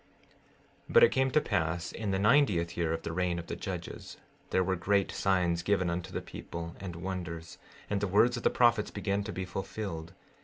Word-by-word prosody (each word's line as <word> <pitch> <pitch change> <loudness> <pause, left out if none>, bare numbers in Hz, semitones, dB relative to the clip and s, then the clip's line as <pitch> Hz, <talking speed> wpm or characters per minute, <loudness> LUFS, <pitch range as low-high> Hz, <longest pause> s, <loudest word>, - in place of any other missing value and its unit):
16:13 - - -7
But 475 - +8
it 470 - +7
came 130 0 +2
to 155 - +4
pass 85 - -1
in 110 -3 -4
the 95 - +1
ninetieth 100 -6 +3
year 85 -2 0
of 80 0 -2
the - - -3
reign 90 0 0
of 85 - -5
the - - -5
judges, - - -6 0.3
there 95 - +2
were 95 +1 0
great 100 +2 +1
signs 90 -3 +1
given 90 -1 +1
unto 85 0 -4
the - - -4
people, 85 0 -7
and 90 -3 -6
wonders; 85 -2 -5 0.3
and 100 -1 -1
the 105 - +1
words 110 +6 +4
of 120 - -4
the - - +3
prophets 120 -3 +3
began 100 0 -1
to 105 - -5
be 95 - -4
fulfilled. 95 -2 -5
95 Hz, 205 wpm, -30 LUFS, 85-105 Hz, 0.3 s, But